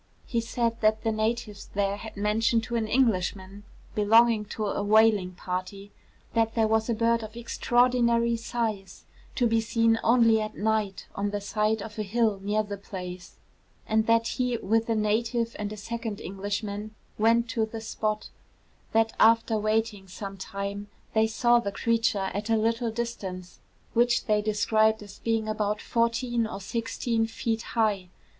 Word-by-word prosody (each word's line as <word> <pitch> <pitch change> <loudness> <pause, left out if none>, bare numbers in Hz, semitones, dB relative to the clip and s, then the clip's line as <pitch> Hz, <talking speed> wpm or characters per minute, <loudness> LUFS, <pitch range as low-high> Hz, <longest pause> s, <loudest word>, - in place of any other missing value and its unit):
He 235 -2 -1
said 230 0 -1
that 215 0 +2
the 225 - +1
natives 215 -1 -2
there 200 0 0
had 220 0 -9
mentioned 225 +2 +2
to 235 +1 -4
an 225 -2 0
Englishman 200 -4 0 0.3
belonging 220 +1 +4
to 215 +1 -4
a 205 - -1
whaling 210 -3 +4
party, 185 +3 -5 0.4
that 225 -1 +1
there 225 -1 +3
was 220 +1 +1
a 230 - +1
bird 230 +1 +2
of 220 +1 -9
extraordinary 235 0 +2
size 225 -5 -4 0.3
to 245 - +2
be 225 -1 +2
seen 230 0 +2
only 230 -2 +5
at 215 - -5
night 215 -2 -1
on 200 +1 -1
the 205 0 -2
side 210 +1 0
of 215 -1 -8
a - - +1
hill 215 0 +1
near 210 +2 0
the 205 -1 -6
place; 180 -2 -8 0.5
and 220 0 +1
that 230 0 +3
he 250 0 -1
with 225 +2 0
a 225 - +2
native 230 +2 0
and 205 0 -3
a 215 - -6
second 225 0 -5
Englishman 205 +2 -4 0.2
went 230 +2 +3
to 220 -1 0
the 225 +1 -6
spot; 215 -1 -3 0.6
that 225 0 +3
after 225 +1 +5
waiting 215 -2 -1
some 195 +2 -7
time 200 +1 -5 0.3
they 220 0 +3
saw 240 +2 +3
the 200 -4 -3
creature 225 -3 0
at 205 +3 -4
a 225 - +3
little 230 +2 0
distance, 200 -6 -5 0.3
which 240 0 +3
they 210 -1 +2
describe 215 +1 +2
as 205 -1 -13
being 225 -1 0
about 210 -1 -1
fourteen 235 0 0
or 200 - -6
sixteen 225 +2 -1
feet 225 0 -2 0.2
high. 205 -5 +1
220 Hz, 165 wpm, -27 LUFS, 205-230 Hz, 0.6 s, only